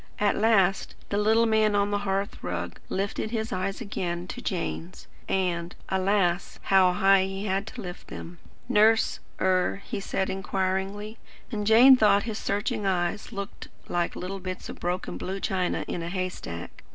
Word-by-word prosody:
At 205 -1 +2
last 195 -4 +2
the 200 - 0
little 220 +2 +4
man 220 -2 +3
on 205 0 +2
the 205 - +1
hearth 195 0 -2
rug 85 0 -4
lifted 200 +3 -2
his 225 +1 -2
eyes 195 +4 -2
again 175 -5 -3
to 245 - -6
Jane's; 180 -3 -4 0.2
and, 175 -2 -1
alas, 190 -2 +1
how 190 -2 +5
high 195 +1 +5
he 195 +1 -4
had 195 +1 -1
to 245 - -7
lift 180 -1 -8
them! 170 0 -9 0.3
"Nurse 220 +1 +4 0.2
er?" 185 +1 +1
he - - -4
said 195 -1 -1
inquiringly, 195 +3 -2 0.3
and 210 -3 -2
Jane 245 +5 +9
thought 210 -4 +4
his 220 -2 -4
searching 215 +2 -1
eyes 185 +2 -1
looked 200 -2 -6 0.2
like 175 -1 0
little 195 +2 -5
bits 185 0 -6
of - - -8
broken 180 +1 -3
blue 190 +1 -4
china 185 -2 -1
in 175 - -3
a 165 - -4
hay 185 0 -1
stack. 85 - -8
195 Hz, 165 wpm, -27 LUFS, 185-210 Hz, 0.3 s, Jane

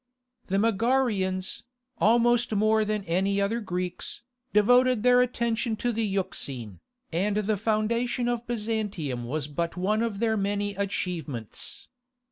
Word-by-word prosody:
The 195 - 0
Megarians, 210 -4 +1 0.4
almost 240 +2 +3
more 215 +1 +3
than 210 -1 -1
any 195 +3 +1
other 200 +4 0
Greeks, 180 0 -4 0.3
devoted 245 +2 +4
their 250 0 +6
attention 235 -2 0
to 240 +3 -1
the 225 0 -1
Euxine, 140 - -2 0.3
and 200 +5 +1
the 210 0 +1
foundation 230 +4 0
of 240 0 -2
Byzantium 210 - -2
was 145 +4 -2
but 170 +4 -3
one 210 +4 +1
of 230 -3 -1
their 220 +1 +1
many 205 0 -1
achievements. 175 - -4
210 Hz, 125 wpm, -27 LUFS, 185-230 Hz, 0.4 s, their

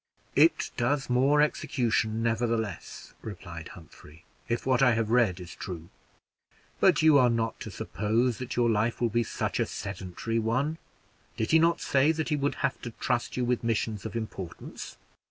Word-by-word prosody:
"It 155 +2 +4
does 135 +1 0
more 140 +4 +4
execution, 115 -6 0
nevertheless," 115 -2 -2
replied 85 -1 -8
Humphrey, 80 0 -16 0.2
"if 120 0 -1
what 130 -1 +2
I 130 -3 +6
have 115 -1 -1
read 115 -7 +3
is 90 0 -9
true. 85 -3 -7 0.9
But - - +4
you 155 -3 +7
are 125 -1 +5
not 115 -1 -1
to - - -6
suppose 115 +4 -1
that 125 -1 -5
your 120 -1 +3
life 115 +1 +1
will 120 - +2
be 120 +2 +1
such 115 - -2
a - - +2
sedentary 95 +3 -4
one. 130 +9 0 0.6
Did 110 - -1
he 160 - +6
not 165 +1 +3
say 140 +3 +3
that 160 0 -2
he 150 - +2
would 145 0 0
have 135 - -2
to 120 - -5
trust 125 -1 -1
you 125 - +1
with 125 -1 0
missions 110 -2 -1
of 110 -1 -6
importance? 95 -6 -6
115 Hz, 170 wpm, -28 LUFS, 110-130 Hz, 0.9 s, you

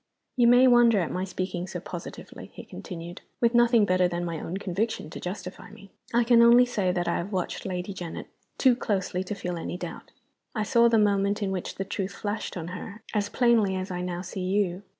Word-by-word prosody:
"You 245 -2 +4
may 245 +2 +7
wonder 240 -3 +6
at 170 - -2
my 185 - -2
speaking 185 -1 -4
so 180 - -5
positively," 175 0 -9
he - - -8
continued, 170 - -8 0.2
"with 235 0 +2
nothing 240 -2 +5
better 185 -1 +3
than 175 0 -3
my 165 -2 -4
own 175 +5 -4
conviction 195 -3 -3
to - - -7
justify 180 +4 -7
me. 200 -1 -15 0.2
I 235 +1 +3
can 235 0 +5
only 240 +1 +7
say 205 -7 0
that 175 -1 -2
I 170 - +1
have 185 +4 -4
watched 185 -1 -3
Lady 185 +1 -4
Janet 175 -3 -6 0.3
too 255 -3 +5
closely 190 -5 -2
to 195 +2 -5
feel 180 -3 -4
any 175 - -4
doubt. - - -8 0.5
I 215 - 0
saw 235 +3 +4
the 230 -1 +3
moment 205 0 +2
in 195 - -1
which 185 -2 -4
the 195 - -4
truth 195 0 -4
flashed 205 -2 -4
on 170 0 -5
her, 200 +4 -8
as 205 -2 0
plainly 230 -6 +3
as 185 0 -4
I 180 0 -3
now 180 0 -4
see 190 +1 -6
you. 185 -1 0
195 Hz, 215 wpm, -27 LUFS, 180-225 Hz, 0.5 s, may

